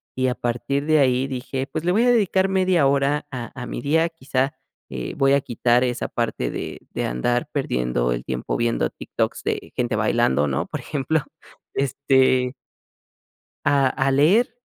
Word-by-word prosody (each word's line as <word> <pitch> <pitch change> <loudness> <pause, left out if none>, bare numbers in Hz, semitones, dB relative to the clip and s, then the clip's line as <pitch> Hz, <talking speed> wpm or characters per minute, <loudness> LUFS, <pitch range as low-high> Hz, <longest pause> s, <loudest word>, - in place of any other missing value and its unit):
y 130 0 +1
a 125 - 0
partir 140 +4 -2
de 155 0 +4
ahí 130 -1 +2
dije: 130 +1 -4
"Pues 155 - -4
le 175 - +2
voy 215 +6 +3
a 245 - +4
dedicar 195 -5 +3
media 185 -6 +3
hora 140 +2 +1
a 125 -3 -6
a - - -4
mi 120 - -5
día, 160 +5 +2
quizá, 135 -4 -2 0.3
eh, 65 -2 -5
voy 135 0 +4
a 140 - +3
quitar 120 0 +2
esa 125 -1 -1
parte - - -2
de - - -5
de - - -3
andar 120 - -1
perdiendo 60 - 0
el - - -4
tiempo 65 -1 -3
viendo 115 - 0
TikToks - - -3
de - - -3
gente 120 -2 0
bailando, 105 - +2
¿no? 70 0 -1
Por - - -5
ejemplo, 150 +2 -1 0.5
este 130 -2 +2 1.1
a 140 -2 +4
a 135 +1 0
leer, 170 - +4
130 Hz, 170 wpm, -23 LUFS, 120-145 Hz, 1.1 s, de